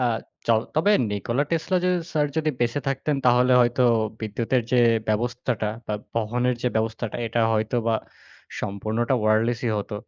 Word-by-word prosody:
আ - - +2 0.4
চল 115 -1 +4
তবে 160 +7 +3 0.2
'Nikola 115 +6 -1
Tesla' 170 +2 0
যদি 180 - +3 0.2
স্যার 150 -1 +2
যদি 155 -1 +1
বেঁচে 120 +4 0
থাকতেন 135 +2 -1
তাহলে 125 +1 +4
হয়তো 120 +1 +2 0.4
বিদ্যুতের 115 +3 -1
যে 125 - +4 0.3
ব্যবস্থাটা 120 0 -1 0.2
বা 105 - -2 0.2
বহনের 120 +3 0
যে 125 - +2
ব্যবস্থাটা 110 0 -2
এটা 115 +1 -1
হয়তোবা 110 +1 0 0.7
সম্পূর্ণটা 110 +5 -1
ওয়ারলেসই 115 +2 +1
হতো 105 +1 -4
120 Hz, 145 wpm, -24 LUFS, 110-130 Hz, 0.7 s, চল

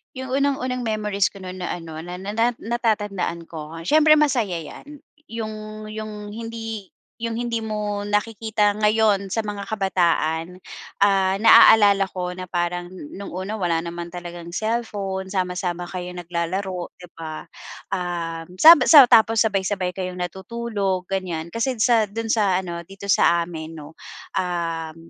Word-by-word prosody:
Iyong 260 0 -6
unang-unang 260 -2 0
memories 210 -2 0
ko 195 - -11
no'n 185 0 -7
na 180 - -3
ano 165 -2 -8
na 180 +1 -7
na 225 +5 0
natatandaan 210 -7 -2
ko 160 0 -8
siyempre 305 - +5
masaya, 245 - +2
iyan. 290 - -11 0.2
Iyong 215 -1 -7
iyong 215 -1 -7
hindi, 225 -2 -7 0.2
iyong 230 0 -3
hindi 235 -2 -2
mo 210 -1 -3
nakikita 210 0 0
ngayon 210 -2 +2
sa - - 0
mga 205 -2 -5
kabataan, 180 -4 0 0.4
ah, 195 -1 +4
naaalala 205 -3 +7
ko 180 -1 -3
na 185 - -6
parang 175 0 -2
noong 185 +3 -9
una 190 +3 -4
wala 175 -4 0
naman 170 0 -6
talagang 175 -1 -8
cellphone, 200 -3 -3
sama-sama 180 -2 -2
kayo 180 -1 -5
naglalaro, 175 +1 -4
'di 180 - -14
ba? 160 -1 -7 0.5
Um, 170 -2 -4
saba 330 +2 +9
sa 290 -5 +10
tapos 225 -1 +5
sabay-sabay 190 -3 0
kayong 185 -1 -4
natutulog, 190 0 -3
ganyan. 175 -4 -3
Kasi 230 +7 -1
sa 230 -3 +4
doon 225 +3 -5
sa 200 -5 +2
ano 170 -2 -6
dito 195 +2 -10
sa 170 -3 +4
amin 160 -2 -7
'no, 150 +2 -12 0.4
um, 165 -3 -2
195 Hz, 140 wpm, -23 LUFS, 175-220 Hz, 0.5 s, sa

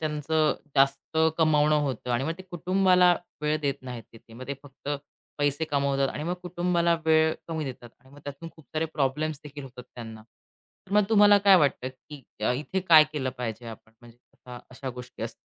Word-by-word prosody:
त्यांचं 155 0 0 0.2
जास्त 140 +3 +1 0.2
कमावणं 155 -1 +4
होतं. 125 -3 -3
आणि 120 +3 0
मग 160 - -1
ते - - -8
कुटुंबाला 180 0 +3 0.3
वेळ 150 +1 +1
देत 140 -2 0
नाहीत 125 -2 -7
तिथे. 115 0 -17
मग 130 +2 -9
ते 140 - -2
फक्त 140 0 -12 0.5
पैसे 145 +2 +1
कमवतात 140 -1 +1
आणि - - -5
मग 175 +2 -1
कुटुंबाला 175 -1 +1
वेळ 160 0 +4
कमी 160 -2 -3
देतात. 120 -3 -8
आणि 130 +1 -22
मग - - -14
त्यातून 145 +4 -7
खूप 160 -4 -18
सारे 160 +1 0
प्रॉब्लेम्स 150 +1 -1
देखील 145 -1 -9
होतात 125 -1 -11
त्यांना. 110 -2 -9
तर 150 - -22
मग 210 - +6
तुम्हाला 205 -2 +6
काय 200 -1 +6
वाटतं, 140 -4 +1
की 135 +2 -13 0.3
इथे 150 +8 -3
काय 165 -4 +7
केलं 130 -4 -2
पाहिजे 120 -1 -5
आपण? 110 0 -11
म्हणजे 120 -1 -16 0.5
अशा 130 +1 -6
गोष्टी 125 0 -10
असतात. - - -4
145 Hz, 180 wpm, -26 LUFS, 130-160 Hz, 0.5 s, काय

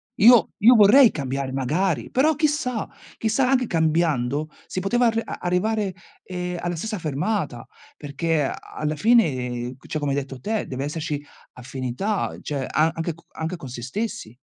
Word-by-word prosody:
Io 235 +1 +7
io 240 +4 +7
vorrei 230 +4 +8
cambiare, 135 -2 -3
magari, 145 +1 -1
però 300 +5 +3
chissà, 290 -6 0 0.3
chissà 225 +4 +1
anche 255 -2 +3
cambiando 155 -4 +1 0.2
si 185 - -3
poteva 240 +6 +2
ar 225 0 +1
arrivare 195 +3 -1 0.3
ehm, 180 -1 -4
alla 175 0 -2
stessa 210 +4 -4
fermata, 155 - -2 0.3
perché 150 +2 -1
a 135 - -1 0.2
alla 155 0 -2
fine, 130 - +2
cioè, 155 - -2
come 145 -1 -1
hai 140 - 0
detto 135 -2 -5
te, 220 +5 -2
deve 135 +1 -4
esserci 150 0 -3 0.3
affinità, 130 - -3
cioè, 140 -3 -3
a 155 +2 +2
anche 165 +1 -3
co 165 +2 -21 0.3
con 140 -6 -9
se 120 -1 -7
stessi, 125 - -5
165 Hz, 155 wpm, -23 LUFS, 135-215 Hz, 0.3 s, vorrei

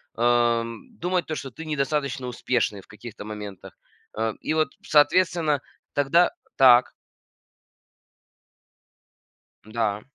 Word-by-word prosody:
ам, 120 -1 +1
думать 180 0 0
то, 155 - -4
что 135 - -6
ты 160 +5 -10
недостаточно 140 -3 -2
успешный 120 -4 -1
в - - -24
каких-то 110 -1 -10
моментах. 105 -3 -8 0.4
Э, 110 0 0
и - - -1
вот, 155 0 +2 0.2
соответственно, 155 -1 +3 0.3
тогда 145 +5 +3 0.3
так. 125 -2 +6 2.7
Да. 110 -2 -1
125 Hz, 100 wpm, -25 LUFS, 115-155 Hz, 2.7 s, так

